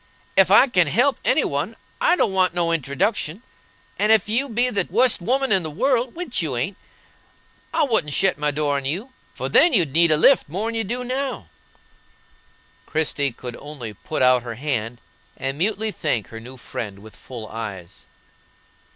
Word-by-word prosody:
Ef 190 -2 +5
I 205 +6 +7
can 180 - +2
help 245 - +2
any - - +3
one, - - -2 0.3
I 350 - +4
don't 200 - +1
want 185 -1 +2
no 170 -1 +1
introduction; 165 - -1 0.6
and 210 +2 +3
ef 220 -4 +4
you 250 +6 0
be 245 +2 +1
the 205 - 0
wust 235 +3 +2
woman 265 +6 0
in 190 -2 +4
the 160 - -5
world 245 - 0
(which 330 - -2
you 145 -7 -2
ain't), 185 +11 -2 1.0
I - - +3
wouldn't 220 - +1
shet 185 0 +1
my 150 0 +1
door 145 -1 0
on 135 - -5
you, 190 - -3 0.2
for - - -4
then 345 - +5
you'd 170 - +2
need 170 +1 +4
a 155 - +5
lift 235 - +4
more'n 210 +8 -3
you 225 0 -1
do 240 +5 -4
now." 260 +2 -3 1.4
Christie 145 -3 0
could 120 +1 -8
only 135 -7 -8
put 130 +7 -3
out 125 -1 +5
her 115 -1 -7
hand, 120 -3 -3 0.4
and 135 +2 -3
mutely 215 +3 0
thank 135 - -2
her 115 - -8
new 125 +3 -11
friend 105 -4 -6
with 110 -2 -13
full 120 -4 -9
eyes. 100 -6 -8
170 Hz, 180 wpm, -22 LUFS, 135-225 Hz, 1.4 s, I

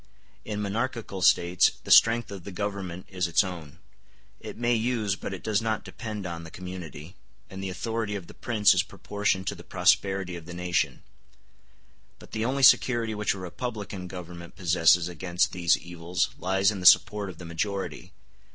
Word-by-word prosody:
In 105 -1 -4
monarchical 110 -1 -3
States 90 0 +4
the - - -5
strength 115 -1 +6
of 95 -3 -8
the 100 - -8
government 95 -2 -4
is 90 -2 -2
its 85 - +3
own; 80 -6 -8 0.6
it - - -9
may 120 +1 +1
use, 110 -3 0
but 100 - -6
it 95 - -7
does 110 -2 +1
not 110 -2 -1
depend 105 -4 -7
on, 85 -2 -5
the 80 - -9
community, 90 -2 -9 0.4
and 95 0 -7
the 95 - -3
authority 110 +2 -3
of 95 -4 -6
the - - -13
prince 110 -4 +3
is - - +3
proportioned 100 -2 -2
to - - -1
the - - -12
prosperity 95 0 +1
of 85 -1 -10
the 85 - -8
nation; 90 0 -1 1.1
but - - -16
the 110 - -2
only 135 +3 -1
security 120 -3 +5
which 105 -1 -1
a - - -8
republican 100 0 -6
government 85 -1 -9
possesses 85 -1 +3
against 90 0 -1
these 85 -2 +2
evils 85 +1 -2
lies 95 +2 +2
in 100 - -5
the 90 - +4
support 105 0 +5
of 95 - -10
the 90 - -10
majority. 95 +2 -4
95 Hz, 180 wpm, -27 LUFS, 90-105 Hz, 1.1 s, strength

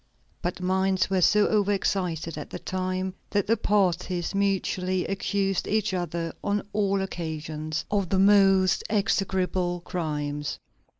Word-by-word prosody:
But 175 0 -3
minds 190 +1 +1
were 190 -1 +2
so 210 +3 +5
overexcited 190 -5 0
at 150 - -7
the - - -6
time 185 0 -3 0.2
that 205 -2 +1
the 225 - +3
parties 180 -4 0
mutually 185 -2 0
accused 195 0 -1
each 215 -1 0
other, 170 -2 -2
on 205 0 0
all 200 -2 +1
occasions, 155 -3 -4
of 200 -4 0
the 195 - +2
most 195 -1 +5
execrable 185 -3 0
crimes. 150 -4 -3
185 Hz, 125 wpm, -26 LUFS, 175-195 Hz, 0.2 s, so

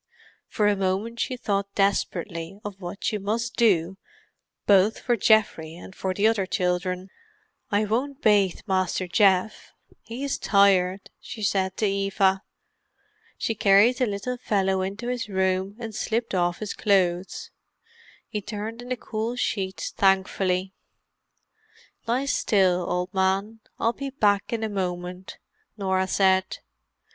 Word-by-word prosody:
For 210 - 0
a 205 - +3
moment 195 +5 -2
she 255 - -1
thought 200 -3 -2
desperately 195 -2 -1
of 200 -1 -7
what 175 +2 -7
she 210 - 0
must 230 +4 -2
do 190 -5 +2 0.7
both 200 +2 +4
for 240 - 0
Geoffrey 200 -8 +2
and 180 +2 -12
for 190 - -2
the 200 +3 0
other 220 -4 +2
children. 180 0 -1 0.6
"I 210 -1 +2
won't 260 +6 -2
bath 205 - +2
Master 185 -1 0
Geoff; 195 +1 +2 0.3
he 230 +5 -7
is 280 - -2
tired," 195 -2 +3
she 220 - -8
said 190 -1 0
to 215 - +1
Eva. 195 -1 +1 1.0
She 225 - -1
carried 210 +3 +5
the 250 - +2
little 210 +5 -3
fellow 195 -5 0
into 200 +5 -4
his 245 -3 -3
room 190 0 0
and 230 -2 -7
slipped 230 +2 -2
off 175 -1 +1
his 215 -2 -5
clothes; 185 -3 0 0.8
he 210 - -4
turned 215 +3 -6
in 245 - -10
the 255 - -1
cool 225 +2 -3
sheets 190 -6 -2
thankfully. 190 -1 +1 1.3
"Lie 250 +4 +1
still, 185 -9 +2
old 180 +2 -2
man; 195 +3 0 0.2
I'll 230 - +1
be 275 +2 -5
back 205 -7 +1
in 230 -1 -2
a - - 0
moment," 180 -2 -4 0.4
Norah 190 -2 0
said. 190 -1 +2
200 Hz, 140 wpm, -25 LUFS, 190-220 Hz, 1.3 s, carried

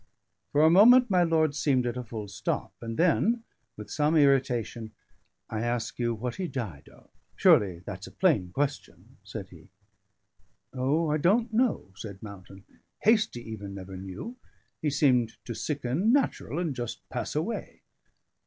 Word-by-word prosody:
For 145 +1 +4
a 160 - +7
moment 245 +6 +7
my 180 -1 +4
lord 160 -3 +2
seemed 135 -4 +1
at 120 -1 -2
a 125 - -4
full 110 -2 -6
stop; 95 -2 -3
and 115 -1 -5
then, 215 +7 +2 0.3
with 105 - -9
some 150 +2 +1
irritation, 125 -6 +2 0.5
"I 110 -1 -3
ask 120 0 -2
you 120 -1 0
what 120 +6 -4
he 185 -1 -2
died 105 - -6
of. - - -21 0.2
Surely 90 -4 +4
that's 95 -1 -7
a - - -11
plain 125 - +1
question," 145 +5 -4
said - - -7
he. - - -16 1.0
"O! 145 +5 +1
I 150 - +2
don't 215 +9 +2
know," 235 - +1
said 100 0 -9
Mountain. 100 -1 -11 0.4
"Hastie 215 - +2
even 100 -3 -7
never 95 0 -8
knew. 95 - -7 0.4
He 155 - +1
seemed 130 -5 +2
to 120 - -4
sicken 145 - 0
natural, 270 - 0
and 165 -6 -1
just 120 -2 -6
pass - - -4
away." - - -3
130 Hz, 155 wpm, -28 LUFS, 110-165 Hz, 1.0 s, a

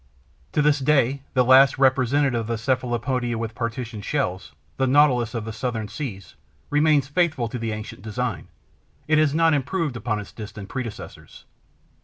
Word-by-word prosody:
To 150 - +2
this 150 0 +3
day, 135 -1 +2
the 125 -1 +4
last 130 +2 +6
representative 130 -1 +2
of 110 - -6
the 115 0 -1
Cephalopoda 120 0 -1
with 115 0 -4
partitioned 115 -2 -5
shells, 95 - -2 0.2
the 130 - +1
Nautilus 130 -4 +3
of 115 -2 -3
the 110 - -5
Southern 115 -2 -3
Seas, 110 -11 -7 0.4
remains 150 -2 +3
faithful 155 -5 0
to 125 - -5
the 115 -1 -2
ancient 105 -2 -7
design; 110 -3 -4 0.6
it 155 0 +4
has 155 -1 +2
not 165 0 +4
improved 145 +1 -1
upon 110 -2 -2
its 105 - -9
distant 105 -2 -9
predecessors. 125 -5 -8
125 Hz, 160 wpm, -23 LUFS, 115-140 Hz, 0.6 s, last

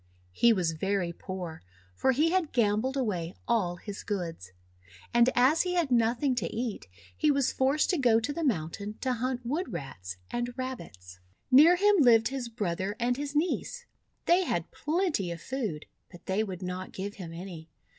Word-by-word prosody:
He 235 - +4
was 180 -6 +1
very 180 +1 -1
poor, 180 -3 -6 0.3
for 265 - +2
he 305 +6 +2
had 365 -4 +1
gambled 235 +3 +1
away 185 -9 -2
all 195 -7 +1
his 200 +3 -8
goods. 165 - -4 0.6
And 240 +1 +5
as 260 +6 +5
he 360 -1 -1
had 335 -6 +1
nothing 240 +3 +2
to 190 -8 0
eat, 230 - -4 0.3
he 305 - +2
was 280 -3 +2
forced 275 +6 +2
to 355 - 0
go 235 -4 +4
to 250 +6 -3
the 335 - -3
mountain 200 - -2
to 260 -1 0
hunt 250 +1 -2
Wood 295 +4 -2
Rats 130 - -6
and 240 +1 -3
Rabbits. 100 - -7 0.3
Near 305 +7 +8
him 410 +2 +4
lived 230 -5 +6
his 260 -3 -4
brother 200 -3 -2
and 245 +1 +1
his 285 +2 -5
niece. 365 +9 -1 0.4
They 355 +2 +4
had 175 - -2
plenty 310 - -1
of 170 -1 -5
food, 215 - -4 0.3
but 175 - -14
they 195 +3 +1
would 190 -3 -6
not 180 +1 -5
give 200 +2 -5
him 175 -4 -7
any. 165 -2 -8
230 Hz, 175 wpm, -29 LUFS, 180-270 Hz, 0.6 s, Near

